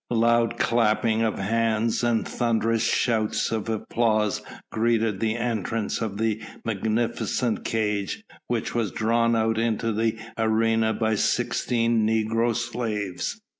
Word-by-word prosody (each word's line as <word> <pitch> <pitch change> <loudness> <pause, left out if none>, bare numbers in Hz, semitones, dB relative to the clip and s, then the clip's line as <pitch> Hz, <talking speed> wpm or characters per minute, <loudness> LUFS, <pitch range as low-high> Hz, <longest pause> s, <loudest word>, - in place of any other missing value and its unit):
Loud 115 0 +2
clapping 115 -1 +2
of 110 -2 0
hands 115 +2 0
and 120 -1 +1
thunderous 115 -1 0
shouts 110 -3 +1
of 110 0 -2
applause 110 -1 0 0.3
greeted 115 -3 +1
the 110 -1 0
entrance 115 -2 -2
of 105 -3 -3
the 110 0 0 0.2
magnificent 115 +2 -1
cage 105 - -1 0.2
which 120 -2 -2
was 115 -4 0
drawn 115 +2 +1
out 110 0 +1
into 115 0 0
the 110 +1 0 0.2
arena 110 0 +2
by 110 0 0
sixteen 115 +2 +1
negro 115 +1 +1
slaves. 110 -5 -3
115 Hz, 120 wpm, -25 LUFS, 110-115 Hz, 0.3 s, Loud